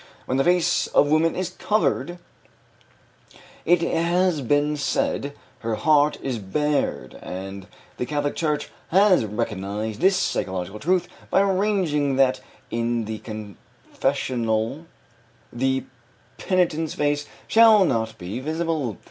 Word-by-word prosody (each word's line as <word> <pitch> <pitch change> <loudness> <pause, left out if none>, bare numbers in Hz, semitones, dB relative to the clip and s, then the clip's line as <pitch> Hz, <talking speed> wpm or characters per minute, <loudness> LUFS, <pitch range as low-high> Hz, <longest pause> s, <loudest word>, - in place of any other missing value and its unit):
"When 130 - -1
the 135 - +3
face 175 +1 +2
of 145 - +3
woman 160 +1 +3
is 185 -2 -2
covered," 175 -4 0 1.5
it 175 0 +4
has 170 -1 +1
been 145 +4 +1
said, 145 -1 -1 0.3
"her 115 -1 -2
heart 150 +5 +3
is 130 -4 -2
bared," 145 +9 -1
and 95 +1 -7 0.3
the 125 - -3
Catholic 145 +1 -1
Church 150 -2 -1 0.2
has 190 - +4
recognized 105 0 -3
this 190 +1 +5
psychological 95 - -2
truth 175 +4 +1 0.2
by - - +4
arranging 185 -8 +1
that 130 -1 +3 0.3
in 115 0 -1
the 110 0 -5
confessional 115 - -3 0.7
the 130 +2 0 0.6
penitent's 165 -4 0
face 145 0 0 0.2
shall 220 -3 +6
not 110 -5 -1
be 95 +6 -5
visible. 155 - -2
145 Hz, 115 wpm, -23 LUFS, 115-170 Hz, 1.5 s, shall